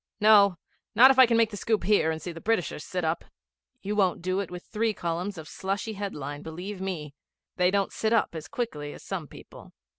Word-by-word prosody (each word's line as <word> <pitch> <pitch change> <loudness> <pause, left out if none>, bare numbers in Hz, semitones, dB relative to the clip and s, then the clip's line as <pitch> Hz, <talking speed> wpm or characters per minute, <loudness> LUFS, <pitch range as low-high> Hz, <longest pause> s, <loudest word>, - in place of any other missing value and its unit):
'No. 205 -3 +6 0.4
Not 255 +5 +9
if 265 - +1
I 260 - +9
can 230 -1 +2
make 225 -1 +3
the 205 - -6
scoop 220 -1 0
here 195 -4 +3
and 160 0 -2
see 175 - -6
the 165 0 -10
Britishers 190 -8 -1
sit 180 -1 -3
up.' 160 +1 -1 0.6
'You 205 +2 -2
won't 185 -5 +1
do 185 +1 0
it 200 - -3
with 180 0 -8
three 220 0 -1
columns 175 +3 -3
of 160 -1 -8
slushy 195 +6 -3
headline, 145 -8 -5
believe 185 +5 -7
me. 165 -7 -4 0.4
They 180 -1 +4
don't 195 0 0
sit 220 - -1
up 230 -6 +2
as 160 -2 -7
quickly 155 - -4
as - - -12
some 180 -6 -5
people.' - - -14
190 Hz, 215 wpm, -27 LUFS, 165-210 Hz, 0.6 s, Not